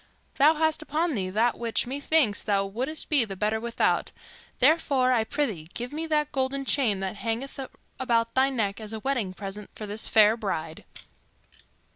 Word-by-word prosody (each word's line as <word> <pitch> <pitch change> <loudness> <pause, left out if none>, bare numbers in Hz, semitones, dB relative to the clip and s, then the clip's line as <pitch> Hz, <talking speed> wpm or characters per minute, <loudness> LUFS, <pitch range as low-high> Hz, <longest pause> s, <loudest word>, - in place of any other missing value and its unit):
Thou 300 +3 +5
hast 315 0 +1
upon 310 +2 -1
thee 190 -6 -2
that 225 +5 +1
which, 230 -1 0
methinks, 275 -3 +2
thou 200 -2 +1
wouldst 255 +10 -2
be 290 -5 +4
the 200 -3 -6
better 210 +3 0
without; 235 +1 0 0.5
therefore, 275 -3 +3
I 230 -3 +2
prythee, 220 - -3
give 245 +3 -5
me 320 +2 -3
that 300 -1 0
golden 270 +1 -1
chain 230 -9 +2
that 190 +1 -3
hangeth 230 +7 -4 0.4
about 230 -3 +1
thy 265 +1 +3
neck 220 -5 -2
as 215 0 -7
a 220 - -4
wedding 240 -6 -1
present 200 +2 -7
for 215 - -6
this 210 +1 -1
fair 215 0 +5
bride." 165 -8 -4
235 Hz, 170 wpm, -26 LUFS, 210-275 Hz, 0.5 s, Thou